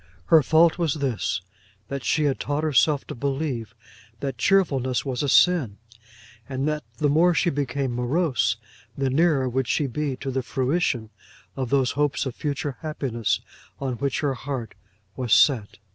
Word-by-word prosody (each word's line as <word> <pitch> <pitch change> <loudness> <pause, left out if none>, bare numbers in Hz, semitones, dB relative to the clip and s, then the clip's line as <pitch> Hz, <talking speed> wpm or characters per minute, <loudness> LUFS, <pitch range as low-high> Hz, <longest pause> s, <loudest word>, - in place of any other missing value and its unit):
Her 160 - +9
fault 160 +5 +4
was 160 -4 +1
this; 130 -8 -1 0.5
that 140 -2 -5
she 155 - +1
had 140 -2 +1
taught 145 +2 -2
herself 150 -1 +3
to - - -7
believe 135 -4 -3 0.4
that 135 -4 -4
cheerfulness 135 -9 +2
was 130 -3 -2
a 145 - 0
sin, 140 - +4 0.7
and 135 +1 -2
that 150 0 -1
the 150 - +1
more 165 +4 +4
she 170 +1 +2
became 140 -2 -2
morose, 125 - +1 0.4
the 135 -1 0
nearer 145 -2 +3
would 130 0 -1
she 150 - +1
be 140 +1 -2
to 135 +1 -5
the 130 0 -1
fruition 130 -4 -1 0.4
of 130 -3 -3
those 135 -2 +2
hopes 145 0 0
of 130 - -3
future 145 -1 -3
happiness 130 -8 -2 0.4
on 135 -2 -2
which 140 +2 -1
her 145 -3 +1
heart 130 -3 -5 0.4
was 125 -3 0
set. 115 -8 +3
140 Hz, 160 wpm, -24 LUFS, 125-150 Hz, 0.7 s, Her